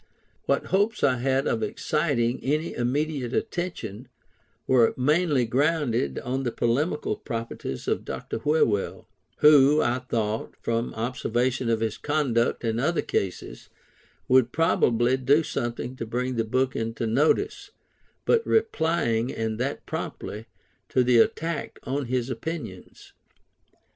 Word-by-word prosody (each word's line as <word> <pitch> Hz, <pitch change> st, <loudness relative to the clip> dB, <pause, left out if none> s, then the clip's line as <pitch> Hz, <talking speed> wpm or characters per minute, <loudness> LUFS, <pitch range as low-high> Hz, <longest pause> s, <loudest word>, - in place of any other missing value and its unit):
What -, -, +1 dB
hopes 205 Hz, +3 st, +2 dB
I 130 Hz, -3 st, +4 dB
had 135 Hz, +2 st, +1 dB
of 115 Hz, -, 0 dB
exciting 130 Hz, -3 st, 0 dB
any 155 Hz, +4 st, 0 dB
immediate 135 Hz, +1 st, -1 dB
attention, 125 Hz, -, -4 dB, 0.6 s
were 125 Hz, -3 st, +4 dB
mainly 150 Hz, 0 st, +2 dB
grounded 130 Hz, -, 0 dB
on 130 Hz, +2 st, -2 dB
the 125 Hz, -3 st, -2 dB
polemical 145 Hz, +8 st, 0 dB
propensities 115 Hz, -, -5 dB
of -, -, 0 dB
Dr -, -, -5 dB
Whewell; 145 Hz, -10 st, +1 dB, 0.4 s
who, 150 Hz, 0 st, +7 dB
I 120 Hz, +2 st, +1 dB
thought, 110 Hz, -3 st, -2 dB
from 115 Hz, +1 st, -2 dB
observation 120 Hz, +1 st, -1 dB
of 115 Hz, -1 st, +1 dB
his 110 Hz, -1 st, -2 dB
conduct 135 Hz, -7 st, 0 dB
in 115 Hz, 0 st, 0 dB
other 160 Hz, +6 st, +1 dB
cases, 95 Hz, -2 st, -3 dB, 0.6 s
would 125 Hz, -2 st, +4 dB
probably 125 Hz, -6 st, +2 dB
do 140 Hz, +5 st, +3 dB
something 120 Hz, -2 st, -3 dB
to 115 Hz, -, -4 dB
bring 125 Hz, +2 st, -2 dB
the 115 Hz, -1 st, 0 dB
book 130 Hz, +4 st, 0 dB
into 115 Hz, +1 st, -2 dB
notice, 160 Hz, -, +1 dB, 0.6 s
by 470 Hz, -, +4 dB
replying, 160 Hz, -, +1 dB
and 110 Hz, 0 st, -3 dB
that 135 Hz, +3 st, -3 dB
promptly, 110 Hz, +2 st, -5 dB, 0.4 s
to 130 Hz, -, +3 dB
the 125 Hz, -1 st, +4 dB
attack 165 Hz, +7 st, 0 dB
on 135 Hz, +2 st, -2 dB
his 125 Hz, +1 st, -1 dB
opinions. 125 Hz, -, -7 dB
125 Hz, 130 wpm, -26 LUFS, 115-150 Hz, 0.6 s, who